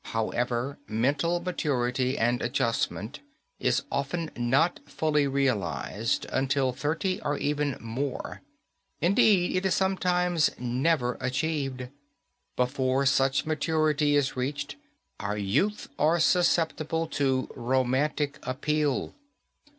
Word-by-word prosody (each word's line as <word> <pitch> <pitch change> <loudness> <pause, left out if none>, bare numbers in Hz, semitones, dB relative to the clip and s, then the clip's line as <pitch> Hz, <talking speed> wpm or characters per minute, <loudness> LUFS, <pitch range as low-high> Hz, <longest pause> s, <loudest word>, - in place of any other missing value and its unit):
However, 120 +4 -1
mental 140 +10 +1
maturity 130 -7 -1
and 120 +2 +1
adjustment 120 -1 -1 0.4
is - - +1
often 155 +4 -2
not 135 +8 +2
fully 150 -2 +1
realized 115 - -1
until 135 0 +1
thirty 160 +9 -2
or 145 0 -1
even 145 -2 -1
more. 125 +4 -4 0.6
Indeed, 185 0 +3
it 185 - -1
is 190 - +1
sometimes 180 -4 +2
never 125 +1 0
achieved. 135 -1 -2 0.7
Before 130 +1 +1
such 135 0 +2
maturity 155 -1 +1
is 140 -2 +1
reached, 145 +3 -3 0.4
our 100 +1 -2
youth 135 - 0
are 160 +3 +3
susceptible 165 -2 +2
to 135 -3 0
romantic 130 +4 0
appeal. 145 +2 -1
140 Hz, 100 wpm, -27 LUFS, 125-155 Hz, 0.7 s, Indeed